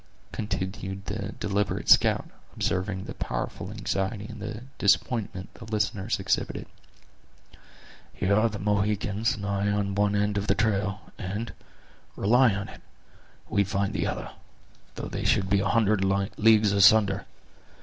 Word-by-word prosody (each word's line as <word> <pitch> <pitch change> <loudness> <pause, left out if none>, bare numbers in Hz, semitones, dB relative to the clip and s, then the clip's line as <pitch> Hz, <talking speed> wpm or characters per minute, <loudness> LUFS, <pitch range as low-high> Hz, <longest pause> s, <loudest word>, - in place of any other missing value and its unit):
continued 95 -1 -4
the 105 0 -4
deliberate 100 -1 -1
scout, - - +5 0.3
observing 95 +1 -1
the - - -7
powerful - - -4
anxiety 100 +2 -2
and 110 +2 -7
disappointment 100 -2 +1
the 115 - -11
listeners 105 -1 -1
exhibited; 95 0 -1 1.5
"here 95 +2 0
are 110 +3 +4
the 105 - -6
Mohicans 105 +2 0
and 100 - -6
I 100 0 0
on 100 -1 0
one 100 +1 +2
end 105 0 +1
of 100 - -4
the 100 - +3
trail, 100 -3 0 0.2
and, 105 +4 -4 0.6
rely 120 +4 +4
on 100 0 -4
it, - - -12 0.7
we 100 - +2
find 100 0 -1
the - - 0
other, - - -4 0.6
though - - -5
they - - -4
should 95 0 +2
be 100 - +4
a 100 0 0
hundred 105 -3 +3
leagues 100 +2 +3
asunder! 100 0 +5
100 Hz, 140 wpm, -27 LUFS, 100-105 Hz, 1.5 s, scout